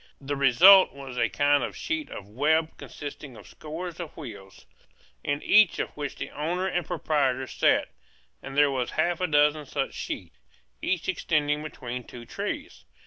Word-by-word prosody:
The 145 +1 -3
result 170 +9 +7
was 135 -2 -9
a 115 -2 +1
kind 145 0 +3
of - - -4
sheet 320 -1 -3
of 100 - -8
web 155 +8 +1
consisting 145 -3 -9
of - - -13
scores 165 +3 -7
of 170 -3 -7
wheels, 100 -10 -10 0.6
in 145 +1 -2
each 210 -3 +5
of - - -2
which 145 -2 -5
the - - -6
owner 170 +5 -2
and 180 -2 -1
proprietor 135 -4 0
sat; - - +1 0.5
and 135 0 -8
there 145 -1 +5
were 130 -2 -1
half 175 +2 -1
a 180 - +1
dozen 150 -1 +2
such 135 0 -2
sheets, - - -6 0.4
each 180 -3 -1
extending 150 -5 0
between 125 -5 -6
two 120 0 -11
trees. - - -5
145 Hz, 165 wpm, -26 LUFS, 135-165 Hz, 0.6 s, result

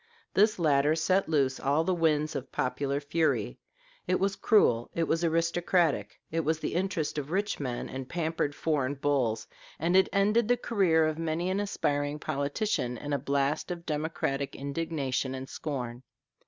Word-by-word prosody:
This 210 +2 +4
latter 150 -2 +3
set 185 +3 +1
loose 135 -4 +1
all 145 +4 +2
the 185 - +1
winds 155 -2 +1
of 130 0 -5
popular 140 +2 -1
fury: 155 +3 0 0.5
it - - +2
was 195 +1 +1
cruel, 120 - +3
it 170 - +1
was 165 +1 +1
aristocratic; 165 - +1
it 165 - 0
was 160 0 +1
in - - -19
the - - -1
interest 175 -5 -1
of 145 0 -6
rich 200 +4 -1
men 125 -4 -3
and 130 0 -6
pampered 160 -3 -1
foreign 145 -4 0
bulls; 130 -5 0 0.3
and 170 +3 +1
it 190 - +5
ended 210 +3 +3
the 245 +1 +3
career 185 -10 +2
of 155 0 -1
many 165 +3 -1
an 190 - 0
aspiring 145 -7 -1
politician 140 - -1
in 145 +3 -4
a 140 - +1
blast 140 +4 0
of 170 -1 -5
democratic 150 -3 -2
indignation 140 -2 -2
and 130 0 -6
scorn. 125 -5 -4
155 Hz, 170 wpm, -29 LUFS, 140-170 Hz, 0.5 s, it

